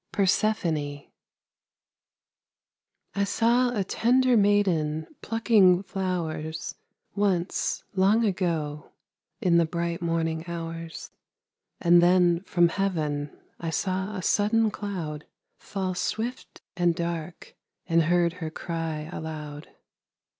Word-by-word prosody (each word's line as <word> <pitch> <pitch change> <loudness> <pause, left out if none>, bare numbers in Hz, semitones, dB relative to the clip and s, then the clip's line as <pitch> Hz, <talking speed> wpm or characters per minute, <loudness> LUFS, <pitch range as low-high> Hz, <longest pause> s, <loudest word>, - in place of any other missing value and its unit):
PERSEPHONE 170 -8 0 2.1
I 200 - +1
saw 235 +5 +2
a 200 - +1
tender 250 +5 +3
maiden 185 -7 +2 0.2
plucking 210 -5 +4
flowers 165 -5 -3 0.4
Once, 190 -3 0
long 200 +4 +3
ago, 165 -7 -2 0.5
in 170 -2 +4
the 170 - +4
bright 170 +1 -3
morning 165 -1 -1
hours; 165 -1 -6 0.7
And 175 0 +6
then 175 -1 +4
from 175 -1 +3
heaven 155 -7 -1 0.3
I 165 - -3
saw 190 +4 -2
a 185 - -4
sudden 215 +3 +2
cloud 175 -8 -5 0.3
Fall 190 -2 -3
swift 220 +7 -4
and 175 -2 +2
dark, 170 -1 -5 0.3
and 165 0 +3
heard 170 +1 +2
her 160 - -2
cry 160 -1 -4
aloud. 150 -2 -6
175 Hz, 100 wpm, -26 LUFS, 160-200 Hz, 2.1 s, And